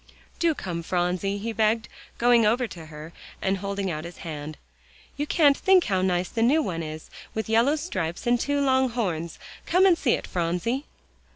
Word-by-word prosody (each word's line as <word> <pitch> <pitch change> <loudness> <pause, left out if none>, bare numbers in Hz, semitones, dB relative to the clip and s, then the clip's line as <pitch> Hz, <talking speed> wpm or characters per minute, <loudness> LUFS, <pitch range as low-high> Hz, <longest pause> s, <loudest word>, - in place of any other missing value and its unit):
"Do 335 -2 +2
come, 175 -9 -4
Phronsie," 180 +3 -1
he 225 +3 -4
begged, 220 +1 +1 0.3
going 240 -1 +5
over 235 +4 +2
to 170 -8 -9
her, 155 +1 -10 0.3
and 190 0 0
holding 200 -1 -2
out 155 -1 -4
his 170 +1 -9
hand. 155 -1 -6 0.6
"You 295 +1 -3
can't 290 -4 +4
think 375 +2 +4
how 190 -2 0
nice 180 -1 +1
the 225 - -2
new 285 +7 +4
one 165 -7 -3
is, 155 0 -7 0.2
with 220 - -2
yellow 230 +7 +3
stripes 185 - -4
and 240 0 +3
two 285 +3 0
long 260 -1 +3
horns. 175 -9 -3 0.3
Come 365 +2 +4
and 370 -3 +6
see 265 -7 +1
it, - - -2
Phronsie." 180 - -1
205 Hz, 185 wpm, -25 LUFS, 175-260 Hz, 0.6 s, and